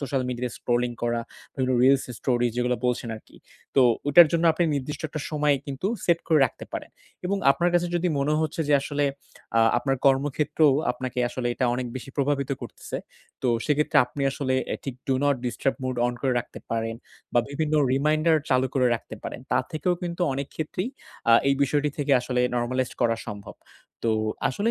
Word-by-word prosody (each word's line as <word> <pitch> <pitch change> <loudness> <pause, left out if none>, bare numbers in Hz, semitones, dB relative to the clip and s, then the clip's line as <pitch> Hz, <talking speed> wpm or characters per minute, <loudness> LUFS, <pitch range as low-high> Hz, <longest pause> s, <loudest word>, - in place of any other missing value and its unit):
Social 135 -1 -1
media 125 0 -3
scrolling 120 0 0
করা 120 0 0 0.3
বিভিন্ন 130 -1 0
reels 135 +1 +5
story 120 -2 +1
যেগুলো 125 0 +1
বলছেন 125 -1 -1
আরকি। 110 - -17 0.4
তো - - +7 0.3
ওইটার 165 +4 +8
জন্য 170 0 +2
আপনি 170 +2 +1
নির্দিষ্ট 140 +2 -4
একটা 155 0 -5
সময় 150 -2 +2
কিন্তু 140 +5 -3 0.2
সেট 170 -1 +3
করে 160 -2 +5
রাখতে - - -11
পারেন। - - -5 0.4
এবং 200 +2 0
আপনার 170 +6 +2
কাছে 175 0 +3
যদি 175 +1 0
মনে 145 +2 +1
হচ্ছে 160 +1 -2
যে, 145 - +5
আসলে 145 0 -1 0.5
আ - - +6 0.2
আপনার 135 +2 0
কর্মক্ষেত্রেও 145 +2 +3 0.2
আপনাকে 125 0 -5
আসলে 125 0 -4
এটা 130 - 0
অনেক 125 0 -2
বেশি 130 +1 -8
প্রভাবিত 140 -1 0
করতেছে। - - -7 0.5
তো 125 - +1 0.2
সেক্ষেত্রে 150 0 +1
আপনি 140 +3 -5
আসলে 130 -2 -1 0.2
এ - - -3
ঠিক 135 - -4
Do 135 - +3
Not 145 -1 +4
Disturb 130 +2 -1
Mode 130 -1 -2
on 120 - -2
করে 130 - +2
রাখতে 120 - -7
পারেন। 115 0 -1 0.4
বা 120 - +5
বিভিন্ন 155 +1 -1 0.2
রিমাইন্ডার 155 +4 +3
চালু 130 0 +3
করে 130 -2 +3
রাখতে 115 - -7
পারেন। - - -6
তার - - +2
থেকেও 165 +4 0
কিন্তু 175 0 -3
অনেক 140 +1 -3
ক্ষেত্রেই 170 +7 -3 0.4
অ্যা 115 - +7 0.2
এই 140 - +2
বিষয়টি 145 +2 0
থেকে 145 0 -1
আসলে 125 0 -1
নরমালাইজড 125 +1 -1
করা 115 -1 +2
সম্ভব। 105 -2 -8 0.5
তো 115 - +2 0.4
আসলে 205 - 0
135 Hz, 185 wpm, -25 LUFS, 125-150 Hz, 0.5 s, ওইটার